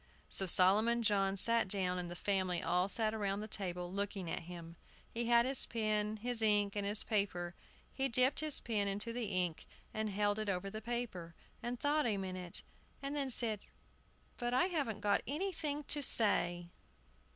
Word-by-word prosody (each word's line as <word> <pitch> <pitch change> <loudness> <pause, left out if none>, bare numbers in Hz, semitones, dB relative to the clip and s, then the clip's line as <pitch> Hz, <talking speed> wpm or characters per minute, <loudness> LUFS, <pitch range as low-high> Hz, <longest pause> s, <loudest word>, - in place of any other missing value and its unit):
So 190 - +1
Solomon 215 +7 +3
John 195 -2 +1
sat 230 +2 +7
down, 185 -2 -1
and 175 -1 -5
the 175 - -7
family 185 -2 -1
all 180 +3 0
sat 220 +1 -1
round 200 -1 -2
the - - -7
table 180 -4 -2
looking 200 -3 -4
at - - -2
him. 170 -1 -9 0.4
He 235 +1 -3
had 235 0 +4
his 265 0 +5
pen, 215 -1 -2
his 240 +1 -1
ink, 205 -2 +2
and 200 -1 -2
his 205 +1 +3
paper. 185 -5 -2 0.4
He 270 0 -1
dipped 255 +3 +2
his 310 -2 +2
pen 210 -4 -2
into 205 +4 -3
the 240 -1 -3
ink 180 -5 -3 0.3
and 215 0 -2
held 205 +1 -1
it 215 -1 -3
over 195 +1 -3
the 215 +1 -7
paper, 215 -8 -5 0.3
and 240 0 -5
thought 295 -1 +1
a 210 -3 0
minute, 185 -2 -3 0.4
and 280 +1 -4
then 280 -2 -2
said, 225 -4 +3 0.8
"But 240 0 -2
I 260 - +3
haven't 275 - -3
got 205 -1 +1
anything 305 -1 -3
to 295 - +4
say." 175 -9 +3
210 Hz, 180 wpm, -34 LUFS, 190-235 Hz, 0.8 s, sat